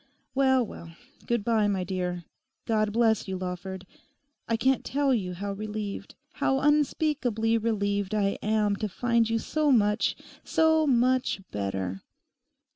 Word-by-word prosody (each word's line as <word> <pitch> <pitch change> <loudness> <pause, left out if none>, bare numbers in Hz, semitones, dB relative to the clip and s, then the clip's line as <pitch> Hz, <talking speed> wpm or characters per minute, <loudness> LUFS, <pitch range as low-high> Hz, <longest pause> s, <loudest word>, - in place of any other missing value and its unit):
Well, 265 -2 +3
well; 165 -5 -11 0.3
good 235 -3 0
bye, 220 -3 +2
my 195 -2 0
dear. 180 -1 -3 0.4
God 215 -2 +1
bless 225 -1 +2
you, 190 -1 -3
Lawford. 185 +1 -5 0.6
I 230 - +1
can't 265 +3 +2
tell 280 -1 +1
you 185 -6 -1
how 200 +2 -4
relieved, 210 0 -5 0.3
how 270 0 +2
unspeakably 285 -6 +1
relieved 205 -2 -1
I 200 -1 0
am 210 -1 +1
to 215 0 -3
find 235 +2 +1
you 230 - +1
so 300 +5 0
much—so 275 +8 +1
much 255 -4 +2
better. 95 -2 -3
215 Hz, 130 wpm, -27 LUFS, 195-250 Hz, 0.6 s, Well